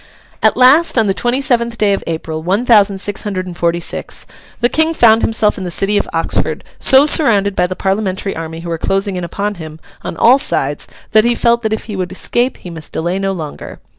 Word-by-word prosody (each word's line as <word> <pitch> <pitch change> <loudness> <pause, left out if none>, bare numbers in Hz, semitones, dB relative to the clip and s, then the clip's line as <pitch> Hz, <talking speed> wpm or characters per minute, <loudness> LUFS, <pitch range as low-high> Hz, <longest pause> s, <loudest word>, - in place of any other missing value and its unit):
At - - +3
last, 265 +5 +5
on 225 - +4
the 195 - +1
twenty 245 +6 -1
seventh 235 -4 0
day 205 -2 +2
of 195 - -3
April, 160 -1 -4
one 195 +8 -1
thousand 205 -4 +4
six 205 +1 -2
hundred 195 -3 -4
and 180 -1 -8
forty 170 0 0
six, 170 - -5 0.3
the 240 - +3
King 320 +5 0
found 225 -3 +5
himself 220 -2 +1
in - - -5
the 180 - -4
city 195 +4 0
of 205 - 0
Oxford, - - -1 0.2
so 270 +1 +5
surrounded 205 -10 +2
by 180 - +1
the 185 - -5
Parliamentary 195 0 -2
army 165 0 -6
who 170 - -7
were 165 -1 -3
closing 195 +2 -1
in 180 - -4
upon 200 +5 -3
him 155 0 -9 0.2
on - - -6
all 250 +8 +5
sides - - -1 0.2
that 215 - +5
he 240 +1 +2
felt 235 0 +2
that 220 -2 -2
if 220 - -2
he 210 - -7
would 185 -2 -4
escape 240 +6 -1
he 180 - -10
must 160 -2 -8
delay 175 +4 -2
no 195 0 -1
longer. 160 -6 -7
200 Hz, 225 wpm, -15 LUFS, 180-235 Hz, 0.3 s, last